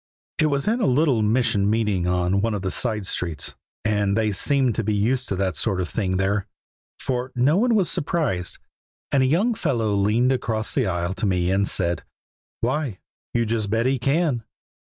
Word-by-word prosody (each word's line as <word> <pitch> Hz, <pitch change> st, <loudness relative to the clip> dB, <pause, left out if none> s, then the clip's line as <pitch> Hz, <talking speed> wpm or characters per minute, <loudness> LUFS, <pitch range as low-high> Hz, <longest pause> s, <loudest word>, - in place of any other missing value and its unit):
It 155 Hz, -, +4 dB
was 140 Hz, +1 st, -1 dB
in 230 Hz, +3 st, +1 dB
a -, -, +2 dB
little 135 Hz, -3 st, +3 dB
mission 105 Hz, -2 st, +2 dB
meeting 105 Hz, -5 st, +1 dB
on 90 Hz, +2 st, +1 dB
one 115 Hz, 0 st, 0 dB
of 100 Hz, -, -4 dB
the 95 Hz, -, -1 dB
side 110 Hz, -1 st, 0 dB
streets, 85 Hz, -5 st, -2 dB, 0.3 s
and 105 Hz, -1 st, +1 dB
they 110 Hz, -1 st, +1 dB
seemed 130 Hz, +5 st, +2 dB
to 115 Hz, -, -2 dB
be 105 Hz, 0 st, 0 dB
used 125 Hz, +5 st, 0 dB
to 95 Hz, -, -1 dB
that 95 Hz, -2 st, -1 dB
sort 95 Hz, +6 st, 0 dB
of 90 Hz, -, -1 dB
thing 95 Hz, -4 st, -1 dB
there, 95 Hz, +1 st, 0 dB, 0.5 s
for 125 Hz, 0 st, -2 dB
no 130 Hz, +6 st, +3 dB
one 235 Hz, +2 st, +3 dB
was 195 Hz, -5 st, +2 dB
surprised; 140 Hz, -, -1 dB, 0.5 s
and 140 Hz, -, +3 dB
a 130 Hz, -, +3 dB
young 195 Hz, -, +2 dB
fellow 115 Hz, -, 0 dB
leaned 105 Hz, +6 st, +2 dB
across 115 Hz, -4 st, -1 dB
the 130 Hz, -6 st, +1 dB
aisle 90 Hz, 0 st, -1 dB
to 100 Hz, +2 st, -2 dB
me 90 Hz, -1 st, +1 dB
and 100 Hz, +1 st, +2 dB
said: 85 Hz, -3 st, 0 dB, 0.6 s
'Why, 130 Hz, -3 st, -1 dB, 0.4 s
you 115 Hz, -1 st, +2 dB
just 110 Hz, -2 st, -1 dB
bet 115 Hz, +3 st, +1 dB
He 130 Hz, 0 st, +1 dB
can!' 135 Hz, -1 st, +1 dB
110 Hz, 195 wpm, -23 LUFS, 100-130 Hz, 0.6 s, It